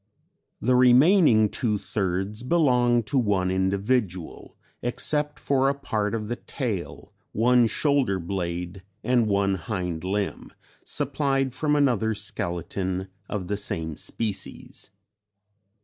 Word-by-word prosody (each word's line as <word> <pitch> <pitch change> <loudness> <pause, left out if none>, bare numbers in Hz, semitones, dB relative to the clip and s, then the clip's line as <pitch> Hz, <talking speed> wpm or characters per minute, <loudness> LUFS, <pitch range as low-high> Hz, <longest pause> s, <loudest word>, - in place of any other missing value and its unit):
The 125 +3 +1
remaining 125 - +6
two 105 0 -1
thirds 95 +2 -2
belong 125 -5 +3
to 135 +5 0
one 100 -5 +1
individual, 95 0 -1 0.2
except 150 +4 0
for 135 -1 +1
a 140 - 0
part 110 -6 -2
of 105 -2 -4
the 120 +2 -3
tail, 115 - -5 0.2
one 120 +2 +4
shoulder 140 -6 +1
blade 90 0 -4 0.2
and 125 -3 +2
one 100 -1 +2
hind 90 -3 -4
limb, 100 +2 -3 0.3
supplied 135 -3 -1
from 150 +1 0
another 120 -7 +2
skeleton 95 -1 -3 0.2
of 95 -4 -4
the 100 +1 -2
same 80 -6 -3
species. 105 +1 -4
105 Hz, 115 wpm, -25 LUFS, 95-125 Hz, 0.3 s, remaining